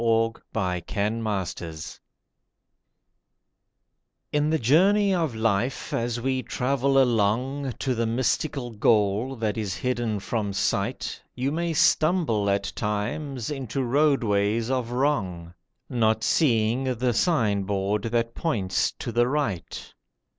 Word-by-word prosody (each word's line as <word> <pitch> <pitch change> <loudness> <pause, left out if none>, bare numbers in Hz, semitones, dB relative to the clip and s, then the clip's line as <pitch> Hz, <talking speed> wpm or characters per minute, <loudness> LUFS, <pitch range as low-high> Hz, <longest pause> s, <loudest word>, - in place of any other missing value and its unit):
THE 115 0 +1
VALLEY 90 -5 -1
OF 105 -2 -1
FEAR 85 -2 -7 2.6
IN 150 0 +1
the 160 - +2
journey 195 - +4
of 165 -9 0
life, 110 +3 -1
as 120 0 -1
we 130 +1 0
travel 135 +3 +1
along 125 +3 +1
To 130 +2 -2
the 115 -1 -1
mystical 125 +2 -1
goal 110 +3 +2
that 110 -2 -2
is 100 -4 -2
hidden 120 -4 -1
from 105 -1 -2
sight, 100 - -1
You 130 +2 -1
may 170 +1 -1
stumble 155 - +2
at 100 0 0
times 115 +5 -3
into 135 -1 -3
Roadways 115 -5 +2
of 125 -3 -1
Wrong, 105 - -1 0.3
Not 110 -3 +1
seeing 120 -3 +2
the 120 +1 0
sign 115 - +2
board 100 +1 -1
that 115 0 0
points 105 - 0
to - - -6
the 120 +1 +2
right. 130 - -3
115 Hz, 120 wpm, -25 LUFS, 105-135 Hz, 2.6 s, journey